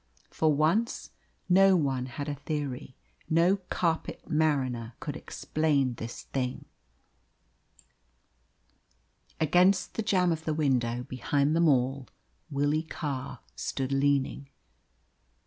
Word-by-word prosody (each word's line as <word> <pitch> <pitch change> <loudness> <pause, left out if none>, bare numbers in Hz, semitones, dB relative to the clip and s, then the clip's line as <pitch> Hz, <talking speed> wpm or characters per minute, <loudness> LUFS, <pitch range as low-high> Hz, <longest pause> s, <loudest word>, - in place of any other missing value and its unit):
For 160 -1 +2
once 165 - +1 0.4
no 190 +1 +6
one 135 -6 0
had 140 +4 -6
a 145 - -1
theory: 140 -3 -4 0.3
no 170 +4 +4
carpet 165 -2 -1
mariner 130 -7 0
could - - -5
explain 145 -5 0
this 115 0 -7
thing. 125 -2 -3 2.7
Against 180 +5 +3
the - - -2
jamb 185 -5 +2
of 160 -1 -2
the 155 -1 -1
window, 125 -5 +1
behind 140 +3 0
them 170 0 +4
all, 130 -1 +1 0.4
Willie 145 +2 +1
Carr 145 -5 -5
stood 130 - -3
leaning. 140 0 +1
145 Hz, 105 wpm, -28 LUFS, 130-160 Hz, 2.7 s, no